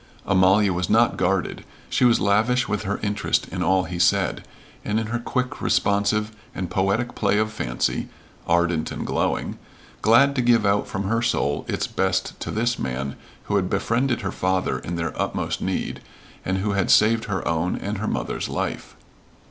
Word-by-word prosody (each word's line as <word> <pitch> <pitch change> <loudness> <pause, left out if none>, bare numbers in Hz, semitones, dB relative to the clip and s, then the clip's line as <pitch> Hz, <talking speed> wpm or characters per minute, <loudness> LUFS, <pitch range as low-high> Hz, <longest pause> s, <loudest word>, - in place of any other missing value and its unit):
Amalia 95 +1 +4
was 90 0 -2
not 115 +2 +4
guarded; 95 +1 -1 0.2
she 125 - +2
was 120 -1 +5
lavish 110 +5 +2
with 105 -1 -2
her 100 - -2
interest 105 +1 0
in - - -4
all 95 0 +3
he 90 -1 -5
said, 95 +2 +2 0.4
and 105 +1 0
in 110 - -2
her 120 +2 -2
quick, 125 +3 -3
responsive, 100 +2 +1 0.2
and 90 -2 -4
poetic 105 +5 0
play 105 -1 +1
of 110 0 +1
fancy 60 - -2 0.4
ardent 85 -1 +1
and - - -4
glowing - - -1 0.4
glad 125 +6 +5
to 130 - +2
give 120 -3 +3
out 100 +1 +2
from 100 - -3
her 115 +4 0
soul 75 -12 0
its - - -1
best 95 0 -1
to - - -5
this 120 +2 0
man 65 +1 -3 0.3
who 100 - 0
had 90 -2 0
befriended 120 +5 0
her 100 -3 -3
father 95 0 0
in 85 - -5
their 85 0 -2
utmost - - -2
need - - -2 0.4
and 95 +1 -1
who 100 +2 -1
had 100 -1 0
saved 110 +1 +4
her 95 -4 -3
own 85 +2 0
and 100 0 -4
her 110 - -2
mother's - - -2
life. - - -4
100 Hz, 180 wpm, -23 LUFS, 95-110 Hz, 0.4 s, was